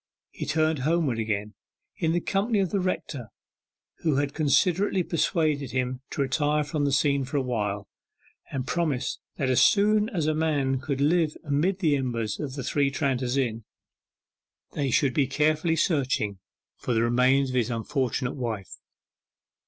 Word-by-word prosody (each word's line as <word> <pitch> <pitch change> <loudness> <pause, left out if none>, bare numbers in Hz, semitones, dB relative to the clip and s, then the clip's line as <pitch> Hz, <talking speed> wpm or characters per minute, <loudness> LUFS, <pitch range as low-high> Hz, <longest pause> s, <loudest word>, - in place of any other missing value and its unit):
He - - -6
turned 155 0 +1
homeward 150 -4 +1
again, 105 -1 -2 0.4
in 160 - +1
the 175 - +2
company 210 +3 0
of 190 -3 +1
the 200 - +1
rector, 160 - -3 0.7
who 155 -4 +1
had 140 0 0
considerately 180 +5 +2
persuaded 155 - 0
him 130 0 -1
to 140 - -1
retire 150 +3 +1
from 150 0 -1
the 140 - +1
scene 140 0 +2
for 130 +3 -3
a - - +2
while, 105 -5 -2 0.6
and 130 -2 -3
promised 155 -5 -1 0.2
that 135 - -1
as 130 -1 +4
soon 210 +1 +4
as 175 - -1
a 155 - +2
man 145 -4 0
could 140 0 -3
live 155 +1 +2
amid 165 +6 0
the 155 -5 +3
embers 115 -5 -2
of 135 -3 -4
the 135 - -4
Three 140 +2 +1
Tranters 135 -3 -1
Inn, 115 -4 -1 1.1
they 140 -2 -1
should 130 +1 +2
be 140 -1 +2
carefully 155 +4 +1
searched 140 -6 +1 0.6
for 125 - -2
the 115 - +3
remains 130 +3 +3
of 130 - -4
his 120 -2 +1
unfortunate 125 +2 -1
wife. 115 -7 -5
140 Hz, 160 wpm, -26 LUFS, 125-160 Hz, 1.1 s, as